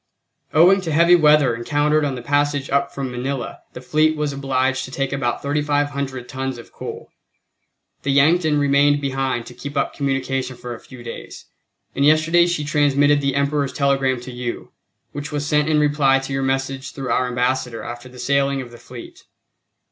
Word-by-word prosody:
Owing 180 +5 +5
to 165 -3 -4
heavy 170 +3 +5
weather 150 -6 +4
encountered 145 +5 +1
on 140 -2 -1
the 125 - -7
passage 145 0 0
up 140 0 +1
from 135 -2 -4
Manila 125 +1 -4
the 125 - -8
fleet 155 +4 +2
was 150 -1 -1
obliged 135 -1 0
to - - -10
take 135 +1 -2
about 135 -3 -2
3500 140 -3 -1
tons 130 -1 -4
of 120 - -13
coal. - - -8 0.9
The 140 - -3
Yankton 155 +2 +3
remained 145 0 +3
behind 135 -3 -2
to - - -11
keep 140 +4 -7
up 140 - 0
communication 135 -2 -2
for 120 0 -7
a 115 - -9
few 125 -2 -13
days, 115 - -9 0.5
and 140 - 0
yesterday 155 +3 +4
she 175 -4 -1
transmitted 145 0 +3
the 140 -1 0
Emperor's 140 -1 0
telegram 135 -2 +1
to 130 +1 -8
you, 120 -1 -6 0.4
which 145 +1 -6
was 145 -1 -2
sent 150 +1 +1
in 155 -1 +3
reply 145 -2 +3
to 135 0 -5
your 135 - -1
message 135 0 -2
through 135 -2 -4
our 125 - +1
Ambassador 125 -1 -1
after 120 +1 -8
the 125 - -14
sailing 140 +2 +1
of 125 -2 -7
the 120 - -13
fleet. 125 -1 -12
140 Hz, 180 wpm, -21 LUFS, 130-145 Hz, 0.9 s, Owing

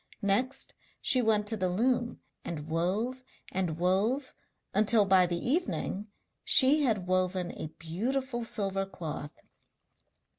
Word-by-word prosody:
Next 245 +7 0 0.3
she 255 - +3
went 215 -2 +2
to 220 - -1
the 185 -3 -1
loom 240 +5 0 0.2
and 155 -3 -5
wove 200 +11 -1 0.3
and 180 -4 -1
wove 205 +10 +1 0.4
until 210 +1 +4
by 190 -2 +5
the 175 0 -1
evening 210 - -1 0.4
she 285 +3 +5
had 220 -9 +1
woven 185 -1 0
a - - -6
beautiful 240 +9 -2
silver 195 -3 -1
cloth. 155 -5 -7
200 Hz, 120 wpm, -30 LUFS, 180-240 Hz, 0.4 s, by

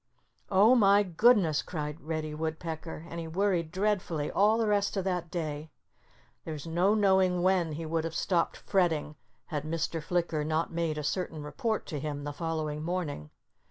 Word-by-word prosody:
"Oh, 205 +5 +6
my 205 -4 +5
goodness!" 185 -4 +4
cried 150 -1 -5
Reddy 155 -1 -3
Woodpecker. 160 +1 -5
And 170 0 -6
he 165 - -5
worried 175 -2 0
dreadfully 185 -6 -1
all 210 +3 +4
the 230 - +1
rest 205 -1 +1
of 190 - 0
that 180 -3 -2
day. 155 -3 -4 0.7
There's 155 -2 -6
no 175 +5 +2
knowing 190 -3 +3
when 180 -4 +2
he 160 +2 -5
would 160 0 -1
have 165 0 -4
stopped 170 -1 0
fretting 165 -6 0 0.4
had 150 - 0
Mr. 165 +1 -2
Flicker 170 -2 -1
not 160 +2 -1
made 165 -2 -1
a 150 - -3
certain 160 -1 -2
report 220 - -2
to 150 -5 -4
him 145 0 -4
the 145 0 -4
following 155 -1 -3
morning. 155 - -3
165 Hz, 165 wpm, -29 LUFS, 155-190 Hz, 0.7 s, Oh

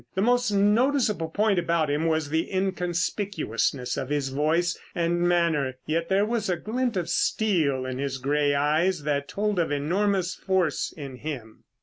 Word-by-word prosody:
The 190 - +1
most 245 0 +3
noticeable 210 - +2
point 205 +2 +2
about 170 -2 +1
him 150 +3 0
was 160 -2 0
the 160 +1 0
inconspicuousness 180 - -1
of 130 - -6
his 145 -2 -1
voice 160 +6 +1 0.2
and 175 0 0
manner, 170 -7 +2
yet 165 +2 -1
there 195 +2 +3
was 220 -2 -1
a 180 - +1
glint 240 +2 -2
of 175 -2 -1
steel 155 -12 +1
in 130 0 -4
his 135 -1 -2
gray 145 +2 +1
eyes 155 +4 +1
that 140 -1 -1
told 210 -2 -1
of 165 - 0
enormous 185 +5 0
force 185 -6 0
in 140 -4 -8
him. 125 -7 -7
170 Hz, 160 wpm, -26 LUFS, 145-195 Hz, 0.2 s, most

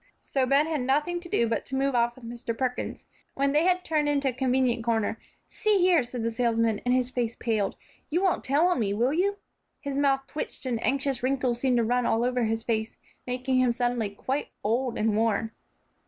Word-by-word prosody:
So 265 -2 -1
Ben 280 +3 +4
had 315 -4 -1
nothing 295 +7 +1
to 345 0 -9
do 235 - +2
but 225 -1 -1
to 265 - -4
move 275 +1 +1
off 240 0 +2
with 260 - -13
Mr. 235 -1 -5
Perkins. 255 -2 -3 0.3
When 275 0 +1
they 300 +4 +3
had 365 0 +2
turned 300 -2 +1
into 280 -2 +2
a - - -3
convenient 255 -2 +1
corner, 225 -1 0 0.3
"See 425 -2 +1
here," 355 -4 +4
said 240 -1 -5
the 230 - 0
salesman, 230 -2 +1
and 250 - +4
his 255 0 0
face 240 -2 -2
paled, 215 -4 -1 0.3
"you 345 +5 0
won't 375 - +1
tell 285 +5 +2
on 360 - +1
me, 200 -3 0
will 245 +6 +1
you?" 395 +5 +1 0.4
His 280 -1 -3
mouth 275 -1 +3
twitched, 300 -1 -5
and 240 -3 -2
anxious 275 -2 0
wrinkles 255 -2 0
seemed 255 -1 +2
to 235 - +3
run 245 +1 +1
all 225 +1 +2
over 250 -1 +1
his 225 0 -1
face, 220 -2 -2 0.3
making 255 +1 0
him 255 -1 +3
suddenly 240 -3 0
quite 260 +8 -3 0.2
old 240 +3 0
and 215 -1 +1
worn. 225 0 +1
250 Hz, 215 wpm, -27 LUFS, 230-275 Hz, 0.4 s, Ben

